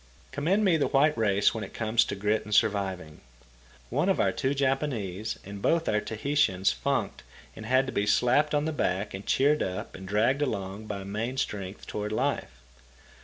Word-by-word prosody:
Commend 185 Hz, +9 st, +1 dB
me 175 Hz, -4 st, +4 dB
the 145 Hz, -, +1 dB
white 150 Hz, +3 st, +3 dB
race 100 Hz, -3 st, +2 dB
when 110 Hz, -1 st, -4 dB
it 95 Hz, -, -9 dB
comes 110 Hz, 0 st, +2 dB
to -, -, -4 dB
grit 105 Hz, +2 st, 0 dB
and 105 Hz, 0 st, -2 dB
surviving. 95 Hz, -8 st, 0 dB, 0.7 s
One -, -, +1 dB
of -, -, +2 dB
our -, -, +3 dB
two 135 Hz, +2 st, -1 dB
Japanese 125 Hz, -8 st, -1 dB
and 100 Hz, 0 st, -8 dB
both 165 Hz, +6 st, +1 dB
our 105 Hz, 0 st, +2 dB
Tahitians 110 Hz, -, +1 dB
funked 60 Hz, -1 st, -2 dB, 0.3 s
and 110 Hz, -, -8 dB
had 130 Hz, +2 st, +3 dB
to 130 Hz, -, -5 dB
be 100 Hz, +1 st, 0 dB
slapped 145 Hz, +7 st, +3 dB
on 145 Hz, 0 st, +1 dB
the 160 Hz, -, -1 dB
back 100 Hz, -6 st, -1 dB
and 95 Hz, +1 st, -7 dB
cheered 145 Hz, +3 st, +3 dB
up 95 Hz, 0 st, -4 dB
and 95 Hz, -, -9 dB
dragged 115 Hz, +8 st, +2 dB
along 100 Hz, -5 st, -3 dB
by 100 Hz, -2 st, -5 dB
main 110 Hz, +6 st, -3 dB
strength 100 Hz, -5 st, -4 dB
toward 105 Hz, 0 st, -4 dB
life. 65 Hz, -, -2 dB
110 Hz, 185 wpm, -28 LUFS, 100-135 Hz, 0.7 s, me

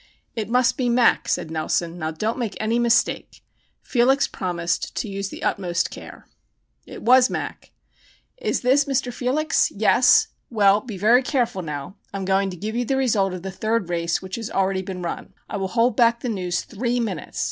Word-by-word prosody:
"It 220 Hz, -2 st, -3 dB
must 250 Hz, +1 st, +2 dB
be 250 Hz, -2 st, 0 dB
'Mac,'" 240 Hz, 0 st, +3 dB
said 160 Hz, -, -1 dB
Nelson. 165 Hz, +2 st, -2 dB
"Now 155 Hz, -1 st, -2 dB
don't 215 Hz, +10 st, -3 dB
make 230 Hz, -4 st, -3 dB
any 225 Hz, +2 st, 0 dB
mistake!" 240 Hz, 0 st, +1 dB, 0.4 s
Felix 265 Hz, +3 st, +3 dB
promised 175 Hz, -2 st, -3 dB
to -, -, -2 dB
use 195 Hz, -1 st, -4 dB
the -, -, -9 dB
utmost 180 Hz, -2 st, -1 dB
care. -, -, -11 dB, 0.6 s
It -, -, -10 dB
was 255 Hz, +2 st, +6 dB
"Mac." -, -, -5 dB, 0.7 s
"Is -, -, -1 dB
this 270 Hz, +3 st, +3 dB
Mr. 265 Hz, -3 st, -1 dB
Felix? 270 Hz, +6 st, +1 dB
Yes? -, -, +4 dB, 0.2 s
Well, 205 Hz, -2 st, +4 dB
be 230 Hz, -6 st, -7 dB
very 230 Hz, +6 st, +5 dB
careful 245 Hz, -7 st, -1 dB
now. 150 Hz, +2 st, -6 dB
I 200 Hz, -, -5 dB
am 195 Hz, -, -4 dB
going 195 Hz, +1 st, +1 dB
to 180 Hz, -, -7 dB
give 215 Hz, +5 st, -4 dB
you 245 Hz, -, 0 dB
the 265 Hz, +3 st, -1 dB
result 215 Hz, -7 st, +2 dB
of 180 Hz, -1 st, -7 dB
the 190 Hz, -, -4 dB
third 215 Hz, 0 st, -1 dB
race 170 Hz, +1 st, -1 dB
which 190 Hz, +2 st, -5 dB
has 225 Hz, -2 st, -5 dB
already 190 Hz, 0 st, 0 dB
been 185 Hz, -1 st, -6 dB
run. 170 Hz, -, -6 dB
I -, -, -4 dB
will 195 Hz, -1 st, -2 dB
hold 230 Hz, +3 st, +1 dB
back 235 Hz, 0 st, +3 dB
the 250 Hz, -, -3 dB
news 180 Hz, -5 st, -2 dB
three 240 Hz, +2 st, -2 dB
minutes. 195 Hz, -10 st, -4 dB
215 Hz, 190 wpm, -23 LUFS, 185-245 Hz, 0.7 s, was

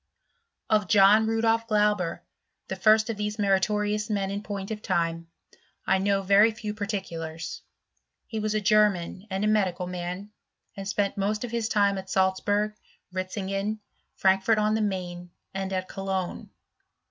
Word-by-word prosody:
y 215 Hz, -, +5 dB
Of 210 Hz, -3 st, -5 dB
John 210 Hz, +3 st, +6 dB
Rudolf 225 Hz, 0 st, +1 dB
Glauber, 210 Hz, -5 st, +1 dB, 0.5 s
the 190 Hz, -, -2 dB
first 215 Hz, +3 st, +4 dB
of 220 Hz, -, -6 dB
these 210 Hz, 0 st, -2 dB
torious 210 Hz, +1 st, +1 dB
men 200 Hz, -2 st, -1 dB
in 200 Hz, +1 st, -3 dB
point 200 Hz, -1 st, -5 dB
of 210 Hz, -1 st, -4 dB
time, 165 Hz, -2 st, -1 dB, 0.6 s
I 190 Hz, -, +3 dB
know 195 Hz, 0 st, +1 dB
very 200 Hz, +3 st, +6 dB
few 215 Hz, -1 st, -5 dB
part 210 Hz, 0 st, -4 dB, 0.2 s
lars. 165 Hz, -1 st, -6 dB, 0.6 s
He 220 Hz, -, -4 dB
was 215 Hz, 0 st, -1 dB
a 215 Hz, -, +1 dB
German 205 Hz, -2 st, +2 dB
and 195 Hz, +2 st, -1 dB
a -, -, +2 dB
medical 190 Hz, -4 st, +1 dB
man, 180 Hz, +3 st, -5 dB, 0.5 s
spent 200 Hz, 0 st, -1 dB
most 210 Hz, +2 st, -1 dB
of 245 Hz, -, -5 dB
his 230 Hz, -2 st, -1 dB
time 200 Hz, -3 st, +2 dB
at 190 Hz, 0 st, -10 dB
Salzburg, 205 Hz, +3 st, +1 dB, 0.4 s
Ritzingen, 195 Hz, +2 st, -2 dB, 0.4 s
Fi 190 Hz, 0 st, +4 dB
fort 220 Hz, +3 st, +2 dB
on 215 Hz, 0 st, +2 dB
the 220 Hz, -, +1 dB
Maine, 180 Hz, -3 st, -3 dB, 0.2 s
and 195 Hz, 0 st, -3 dB
at 185 Hz, -1 st, -2 dB
Cologne. 190 Hz, -2 st, -4 dB
200 Hz, 160 wpm, -27 LUFS, 190-215 Hz, 0.6 s, John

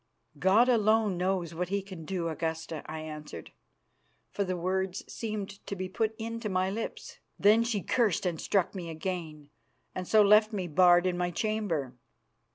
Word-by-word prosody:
"'God 200 Hz, -, +5 dB
alone 220 Hz, -4 st, +3 dB
knows 180 Hz, -2 st, -1 dB
what 175 Hz, +2 st, -3 dB
He 200 Hz, 0 st, -1 dB
can 185 Hz, -5 st, -9 dB
do, 175 Hz, -1 st, -2 dB
Augusta,' 160 Hz, 0 st, -3 dB
I 155 Hz, 0 st, -5 dB
answered, 150 Hz, -, -8 dB, 0.8 s
for 200 Hz, -, -1 dB
the 185 Hz, -2 st, -2 dB
words 185 Hz, +2 st, -1 dB
seemed 205 Hz, -3 st, -5 dB
to 200 Hz, -, -3 dB
be 185 Hz, 0 st, -4 dB
put 220 Hz, +3 st, -1 dB
into 230 Hz, -1 st, -4 dB
my 185 Hz, 0 st, 0 dB
lips. 225 Hz, +3 st, -6 dB, 0.2 s
"Then 215 Hz, +3 st, +5 dB
she 230 Hz, -4 st, -1 dB
cursed 225 Hz, -7 st, +1 dB
and 170 Hz, -3 st, -1 dB
struck 195 Hz, -4 st, +1 dB
me 180 Hz, -4 st, -6 dB
again, 160 Hz, -3 st, -5 dB, 0.4 s
and 185 Hz, -1 st, -5 dB
so 215 Hz, -1 st, +6 dB
left 215 Hz, +2 st, +5 dB
me 190 Hz, -3 st, -2 dB
barred 175 Hz, +2 st, +5 dB
in 180 Hz, -1 st, 0 dB
my 175 Hz, 0 st, 0 dB
chamber. 175 Hz, -, -2 dB
185 Hz, 165 wpm, -29 LUFS, 170-210 Hz, 0.8 s, so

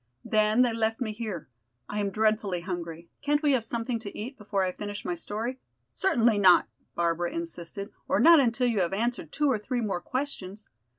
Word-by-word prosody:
Then 215 Hz, +3 st, +3 dB
they 240 Hz, -2 st, +1 dB
left 225 Hz, 0 st, 0 dB
me 230 Hz, -4 st, -2 dB
here. 215 Hz, -, -5 dB, 0.4 s
I 210 Hz, -, -3 dB
am 200 Hz, -1 st, 0 dB
dreadfully 215 Hz, -3 st, +1 dB
hungry; 170 Hz, -2 st, -6 dB
can't 295 Hz, +1 st, +1 dB
we 295 Hz, -, +4 dB
have 255 Hz, -5 st, +2 dB
something 230 Hz, +1 st, -1 dB
to 205 Hz, -2 st, -8 dB
eat 240 Hz, +6 st, -5 dB
before 205 Hz, -4 st, -1 dB
I 185 Hz, -, 0 dB
finish 205 Hz, +2 st, -6 dB
my 180 Hz, -, -1 dB
story?" 220 Hz, +8 st, -4 dB, 0.3 s
"Certainly 235 Hz, -, +2 dB
not," 185 Hz, -3 st, +6 dB, 0.3 s
Barbara 170 Hz, 0 st, 0 dB
insisted, 200 Hz, -, -6 dB, 0.2 s
"or 280 Hz, -, +2 dB
not 335 Hz, -1 st, +8 dB
until 250 Hz, -1 st, +2 dB
you 230 Hz, -5 st, +2 dB
have 175 Hz, 0 st, 0 dB
answered 225 Hz, -6 st, -1 dB
two 295 Hz, -, 0 dB
or 230 Hz, -, +1 dB
three 245 Hz, +4 st, -2 dB
more 205 Hz, -6 st, -2 dB
questions. 215 Hz, -7 st, -4 dB
215 Hz, 190 wpm, -28 LUFS, 190-245 Hz, 0.4 s, not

